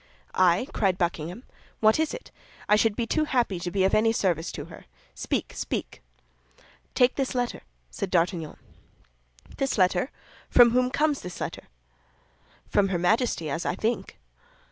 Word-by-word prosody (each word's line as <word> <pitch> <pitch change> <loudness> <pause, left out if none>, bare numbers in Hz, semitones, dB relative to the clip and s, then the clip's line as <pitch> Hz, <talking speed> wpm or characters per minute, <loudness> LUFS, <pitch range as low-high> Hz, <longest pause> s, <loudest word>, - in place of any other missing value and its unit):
"I!" 185 +5 +3
cried 190 -3 +1
Buckingham. 175 +4 -2 0.4
"What 220 +5 +4
is 315 - +1
it? - - -8 0.4
I 210 - +5
should 215 0 +2
be 235 - -1
too 310 +6 +1
happy 240 - 0
to 175 +1 -3
be 190 +2 0
of 190 - +2
any 225 +1 +4
service 175 -7 0
to - - -6
her. - - -13 0.3
Speak, - - -3
speak!" - - -4 0.9
"Take 250 0 +3
this 270 -2 -1
letter," 245 -1 -2 0.3
said 200 -4 -4
D'Artagnan. 170 -3 0 1.0
"This 270 -3 -1
letter! 185 +5 +2 0.4
From 240 -1 +7
whom 250 +1 +2
comes 295 +1 +1
this 180 0 -8
letter?" - - -5 1.0
"From 200 -1 +2
her 190 -2 -1
Majesty, 180 -1 +1
as 165 +3 -2
I - - -1
think." 225 +4 -2
205 Hz, 155 wpm, -26 LUFS, 180-245 Hz, 1.0 s, From